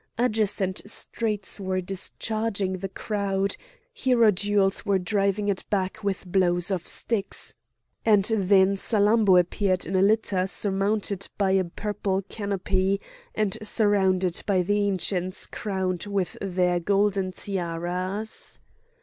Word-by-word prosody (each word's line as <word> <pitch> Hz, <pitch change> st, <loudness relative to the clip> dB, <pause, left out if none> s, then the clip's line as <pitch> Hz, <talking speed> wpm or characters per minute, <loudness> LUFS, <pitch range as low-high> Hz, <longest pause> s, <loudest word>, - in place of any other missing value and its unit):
Adjacent 210 Hz, -5 st, 0 dB
streets 210 Hz, -3 st, -2 dB
were 190 Hz, -1 st, -1 dB
discharging 195 Hz, +1 st, -2 dB
the 195 Hz, +1 st, -4 dB
crowd, 200 Hz, -1 st, -1 dB, 0.4 s
hierodules 205 Hz, -, +2 dB
were 200 Hz, -2 st, +2 dB
driving 200 Hz, +2 st, 0 dB
it 200 Hz, -2 st, -1 dB
back 195 Hz, +1 st, -1 dB
with 200 Hz, -1 st, -2 dB
blows 175 Hz, 0 st, +2 dB
of 180 Hz, -3 st, -2 dB
sticks; 210 Hz, -4 st, -1 dB, 0.5 s
and 210 Hz, -3 st, +4 dB
then 195 Hz, -1 st, +4 dB
Salammbô 205 Hz, -2 st, +4 dB
appeared 185 Hz, +1 st, 0 dB
in 190 Hz, -, -3 dB
a 185 Hz, -, +4 dB
litter 200 Hz, -2 st, +2 dB
surmounted 200 Hz, 0 st, 0 dB
by 195 Hz, -2 st, +2 dB
a 190 Hz, 0 st, +3 dB
purple 195 Hz, +1 st, -2 dB
canopy, 195 Hz, -1 st, 0 dB, 0.4 s
and 210 Hz, -3 st, 0 dB
surrounded 190 Hz, -4 st, +2 dB
by 190 Hz, -3 st, +2 dB
the 205 Hz, +2 st, +1 dB
Ancients 185 Hz, -1 st, -1 dB
crowned 190 Hz, -3 st, -3 dB
with 200 Hz, -3 st, -1 dB
their 180 Hz, -2 st, +1 dB
golden 195 Hz, +1 st, +1 dB
tiaras. 185 Hz, +3 st, -4 dB
195 Hz, 115 wpm, -25 LUFS, 185-205 Hz, 0.5 s, and